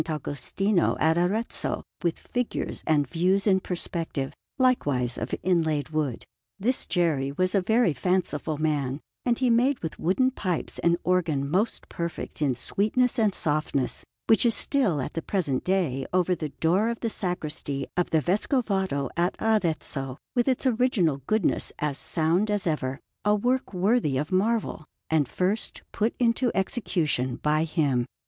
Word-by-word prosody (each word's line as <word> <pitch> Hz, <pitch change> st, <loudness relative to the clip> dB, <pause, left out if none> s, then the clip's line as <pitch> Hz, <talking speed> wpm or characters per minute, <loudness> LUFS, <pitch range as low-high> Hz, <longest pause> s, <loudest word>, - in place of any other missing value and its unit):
Agostino 165 Hz, +6 st, 0 dB
at 160 Hz, +1 st, +3 dB
Arezzo 195 Hz, +7 st, -1 dB, 0.2 s
with 170 Hz, -2 st, 0 dB
figures 245 Hz, -1 st, -3 dB
and 145 Hz, -3 st, +3 dB
views 185 Hz, +6 st, +1 dB
in 190 Hz, -3 st, +4 dB
perspective, 165 Hz, -6 st, -4 dB, 0.2 s
likewise 145 Hz, -, +2 dB
of -, -, -3 dB
inlaid 160 Hz, -5 st, +1 dB
wood. 150 Hz, -6 st, -2 dB, 0.3 s
This 250 Hz, +6 st, 0 dB
Geri 155 Hz, -7 st, +1 dB
was 185 Hz, +4 st, +1 dB
a 200 Hz, -, +3 dB
very 220 Hz, -2 st, +3 dB
fanciful 160 Hz, -2 st, -1 dB
man, 145 Hz, -3 st, 0 dB, 0.3 s
and 240 Hz, -2 st, +2 dB
he 255 Hz, -2 st, +2 dB
made 250 Hz, +4 st, +3 dB
with 160 Hz, -, -4 dB
wooden 255 Hz, +10 st, +2 dB
pipes 185 Hz, -, -3 dB
an 170 Hz, 0 st, +3 dB
organ 165 Hz, -6 st, +1 dB
most 195 Hz, +10 st, 0 dB
perfect 170 Hz, -2 st, -5 dB
in 135 Hz, -4 st, +2 dB
sweetness 235 Hz, -, +1 dB
and 210 Hz, -3 st, +3 dB
softness, 145 Hz, -4 st, 0 dB, 0.2 s
which 225 Hz, -, +5 dB
is 235 Hz, -2 st, +3 dB
still 235 Hz, -, +2 dB
at -, -, -6 dB
the 165 Hz, -, -2 dB
present 155 Hz, -8 st, -1 dB
day 170 Hz, -9 st, 0 dB
over 180 Hz, 0 st, +2 dB
the 155 Hz, -3 st, -3 dB
door 180 Hz, +10 st, +1 dB
of 235 Hz, -, -4 dB
the 230 Hz, -, 0 dB
Sacristy 155 Hz, -7 st, -3 dB
of 180 Hz, -, +1 dB
the 160 Hz, -1 st, +2 dB
Vescovado 190 Hz, -, 0 dB
at 175 Hz, +1 st, +1 dB
Arezzo, 160 Hz, -, 0 dB, 0.2 s
with 240 Hz, 0 st, +2 dB
its 260 Hz, 0 st, +1 dB
original 225 Hz, -, +2 dB
goodness 215 Hz, -4 st, +1 dB
as 145 Hz, -2 st, -2 dB
sound 170 Hz, +6 st, +1 dB
as 205 Hz, -2 st, 0 dB
ever 140 Hz, -5 st, -1 dB, 0.2 s
a 210 Hz, 0 st, +4 dB
work 250 Hz, +4 st, 0 dB
worthy 190 Hz, -, +2 dB
of 150 Hz, +5 st, -2 dB
marvel, 210 Hz, -2 st, 0 dB, 0.3 s
and 155 Hz, -4 st, +3 dB
first 190 Hz, -, -2 dB
put 220 Hz, +2 st, 0 dB
into 240 Hz, +1 st, +2 dB
execution 165 Hz, -, 0 dB
by 155 Hz, +3 st, +1 dB
him. 140 Hz, -7 st, +1 dB
180 Hz, 155 wpm, -26 LUFS, 150-215 Hz, 0.3 s, which